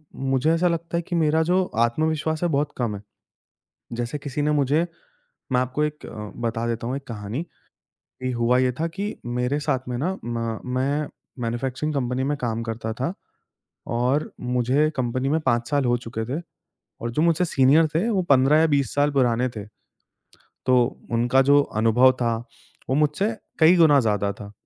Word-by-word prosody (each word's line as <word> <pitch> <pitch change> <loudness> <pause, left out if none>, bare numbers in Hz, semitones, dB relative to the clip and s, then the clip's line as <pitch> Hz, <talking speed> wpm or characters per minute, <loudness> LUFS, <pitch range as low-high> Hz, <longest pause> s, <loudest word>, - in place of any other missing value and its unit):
मुझे 135 +3 +1
ऐसा 175 +2 +2
लगता 170 0 -2
है - - 0
कि 175 - -2
मेरा 160 0 +3
जो 180 +3 +2 0.2
आत्मविश्वास 155 +5 -1
है, 175 - +2
बहुत 145 0 0
कम 115 -4 -1
है। 100 - -8 0.9
जैसे 120 +5 -3
किसी 145 +1 -4
ने 150 - +1
मुझे 150 +3 +2 0.7
मैं 125 - +3
आपको 130 +4 -1
एक 150 0 -5
अ, - - -9 0.3
बता 115 0 -1
देता 115 0 -2
हूँ 130 +3 -2
एक 140 - -8
कहानी 110 +6 -4 0.8
कि 130 - -1
हुआ 120 +1 +2
ये 130 -1 +2
था 165 - +1
कि 200 +5 -4
मेरे 125 +4 -1
साथ 135 -4 -2
में 125 - -2
ना, 180 +8 -1
म 115 -1 -3
मैं 140 +3 0 0.3
मैन्युफैक्चरिंग 130 +6 -2
कंपनी 130 -1 -1
में 145 +1 0
काम 115 -2 -2
करता 110 -1 -4
था 130 +8 -2 0.9
और 130 +5 0
मुझे 125 +4 +1
कंपनी 130 +1 -1
में 160 +3 +1
5 120 -4 0
साल 145 -2 +2
हो 120 0 +3
चुके 115 -2 -5
थे 170 - -3 0.6
और 115 - -3
जो 150 - +1
मुझसे 170 +1 +3
सीनियर 150 0 +4
थे, 180 +8 +1
वो 195 -4 +1
15 135 +3 +5
या 160 - +5
20 140 -2 +1
साल 145 +1 +3
पुराने 125 -2 +2
थे। 105 - -5 1.0
तो 130 - +5 0.4
उनका 120 +3 +3
जो 145 +1 +5 0.2
अनुभव 115 +4 +5
था, 115 -1 +1 0.5
वो 130 - +2
मुझसे 150 +8 +1 0.3
कई 165 +3 +7
गुना 155 -4 +6
ज़्यादा 105 -3 0
था। 100 0 -10
135 Hz, 180 wpm, -24 LUFS, 120-155 Hz, 1.0 s, कई